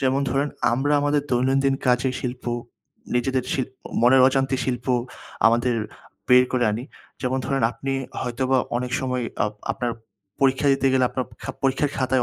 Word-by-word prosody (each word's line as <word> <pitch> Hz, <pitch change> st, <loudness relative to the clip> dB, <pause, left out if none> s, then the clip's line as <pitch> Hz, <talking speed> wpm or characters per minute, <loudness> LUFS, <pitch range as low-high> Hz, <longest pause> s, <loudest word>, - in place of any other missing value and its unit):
যেমন 135 Hz, +1 st, +2 dB
ধরেন 140 Hz, +3 st, 0 dB, 0.2 s
আমরা 135 Hz, +4 st, +1 dB
আমাদের 145 Hz, 0 st, +1 dB
দৈনন্দিন 135 Hz, +2 st, +2 dB
কাজে 125 Hz, +1 st, +3 dB
শিল্প, 125 Hz, 0 st, -5 dB, 0.7 s
নিজেদের 130 Hz, +1 st, +1 dB
শিল্প, 130 Hz, -1 st, -2 dB, 0.3 s
মনের 125 Hz, +3 st, +6 dB
অজান্তে 135 Hz, 0 st, +1 dB
শিল্প 125 Hz, -2 st, -3 dB, 0.6 s
আমাদের 120 Hz, +2 st, +3 dB, 0.5 s
বের 125 Hz, 0 st, +7 dB
করে 125 Hz, -1 st, +2 dB
আনি। 110 Hz, +3 st, -3 dB, 0.4 s
যেমন 130 Hz, +1 st, 0 dB
ধরেন 135 Hz, -1 st, 0 dB
আপনি 135 Hz, 0 st, -4 dB, 0.3 s
হয়তোবা 130 Hz, +2 st, 0 dB, 0.2 s
অনেক 125 Hz, 0 st, -3 dB
সময় 125 Hz, -1 st, -1 dB, 0.2 s
অ -, -, +1 dB, 0.3 s
আপনার 120 Hz, -2 st, -2 dB, 0.5 s
পরীক্ষা 135 Hz, +1 st, +3 dB
দিতে 135 Hz, 0 st, +1 dB
গেলে 130 Hz, -1 st, +3 dB
আপনার 130 Hz, -, -2 dB
প -, -, -27 dB, 0.3 s
পরীক্ষার 135 Hz, +2 st, +1 dB
খাতায় 130 Hz, -1 st, +2 dB
130 Hz, 150 wpm, -23 LUFS, 125-135 Hz, 0.7 s, বের